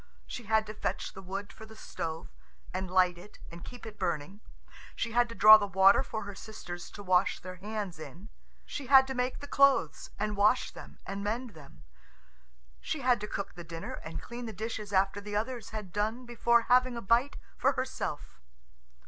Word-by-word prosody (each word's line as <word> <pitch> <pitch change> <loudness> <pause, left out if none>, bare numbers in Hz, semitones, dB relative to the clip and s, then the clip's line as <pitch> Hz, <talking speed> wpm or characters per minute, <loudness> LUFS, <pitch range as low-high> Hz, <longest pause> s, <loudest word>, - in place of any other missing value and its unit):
She 240 - -7
had 220 +1 +2
to 215 - -7
fetch - - -3
the 195 - -9
wood 195 +2 -6
for 220 - -12
the 220 - -13
stove, 160 -6 -6 0.4
and 185 0 -3
light 180 -1 +3
it 205 +4 -14
and 170 0 -9
keep 245 -1 -10
it 215 -1 -10
burning. 185 +2 -3 0.5
She 230 - -2
had 240 +1 +3
to 230 - -8
draw 215 0 +10
the 205 -1 -2
water 195 +2 +6
for 220 -5 -5
her 200 0 -7
sisters 180 -4 -8
to 205 - -9
wash 185 0 +2
their 185 0 -8
hands 205 -3 -5
in. 180 +6 -10 0.4
She 280 -3 -6
had 265 0 +8
to 265 - -4
make 250 +1 -2
the 285 - -7
clothes, 275 -1 +3
and 210 0 -2
wash 210 +5 +3
them - - -12
and 200 +1 -5
mend 230 +4 -2
them. 140 - -15 1.0
She 310 - -4
had 245 -3 +3
to 210 - -4
cook 200 - -4
the 175 - -9
dinner, 165 0 -7
and 160 - -6
clean 240 0 -7
the 220 - -6
dishes 215 0 -5
after 195 +1 +2
the 205 0 -6
others 230 +1 -3
had 210 -5 -7
done 220 +4 -1
before 235 0 +3
having 250 0 +3
a - - -4
bite 235 +7 +2 0.2
for - - +2
herself. - - -4
210 Hz, 200 wpm, -30 LUFS, 190-235 Hz, 1.0 s, draw